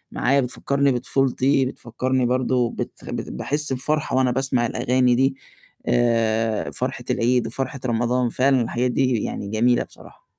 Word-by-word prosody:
معايا؛ 140 +3 +2
بتفكّرني 140 +3 0
بطفولتي، 135 +1 +1
بتفكّرني 130 +1 -2
برضه 125 -1 +1
بت - - -7 0.2
باحس 150 -1 -2
بفرحة 150 +3 -1
وأنا 130 -1 +3
باسمع 130 -1 0
الأغاني 125 +1 +2
دي، 135 +2 +2 0.5
آآ 115 -2 +1
فرحة - - -4
العيد 120 0 +1
وفرحة 135 +3 -4
رمضان 120 +1 +1
فعلًا 130 +2 +2
الحاجات 120 +2 -1
دي 130 -4 +1
يعني 100 - -4
جميلة 120 +3 +2
بصراحة. - - -17
125 Hz, 135 wpm, -22 LUFS, 120-135 Hz, 0.5 s, وأنا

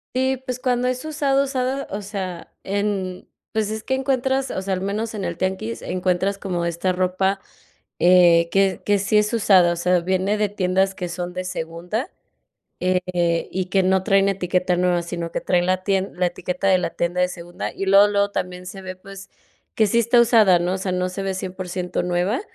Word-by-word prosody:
Y 260 +1 +1
pues, 255 -1 -6
cuando 250 -1 0
es 255 +3 -2
usada, 280 -3 +1
usada, 265 0 -2
o 200 +2 -3
sea, 190 -4 -6
en, 195 -2 -2 0.2
pues 220 -1 -1
es 220 0 -4
que - - -2
encuentras, 265 0 0
o - - -3
sea, 190 0 -2
al 185 - -2
menos 210 +4 -2
en 205 -3 -4
el 170 -2 -3
tianguis 180 -13 -3
encuentras 185 +2 0
como 180 -4 -2
esta 170 +2 -1
ropa 185 +2 0 0.6
eh, 175 -2 +5
que 195 -1 +2
que 205 0 +3
sí 200 +2 +2
es 210 0 0
usada, 190 -6 +4
o - - -4
sea, 180 +1 +2
viene 190 +3 0
de 210 -1 +1
tiendas 190 0 0
que 180 -2 -4
son 175 +1 -5
de 185 0 -4
segunda, 180 - -4 0.7
eh, 180 -2 0
y 185 0 -2
que 195 +1 +2
no 190 0 +2
traen 195 -1 +3
etiqueta 180 -1 0
nueva, 180 -1 +2
sino 170 -1 -5
que - - -3
traen 175 -1 +1
la 185 0 0
tien 195 0 0
la 180 0 +1
etiqueta 180 +2 -3
de 190 -1 +5
la 170 - -2
tienda 175 +1 -1
de 180 - +2
segunda, 175 -1 -6
y 195 - -4
luego, 200 +1 +7
luego 200 0 +1
también 180 -2 -4
se 195 +1 -8
ve, 185 0 -6
pues, 195 +1 -12 0.5
que 220 - +3
sí 220 - +1
está 235 +1 +4
usada, 215 -6 +5
¿no? 175 +2 -1
O - - -3
sea, 185 0 -2
no 180 0 -1
se 195 +2 -5
ve 195 0 -2
100% 185 -1 -4
nueva. 180 - 0
190 Hz, 205 wpm, -22 LUFS, 180-205 Hz, 0.7 s, luego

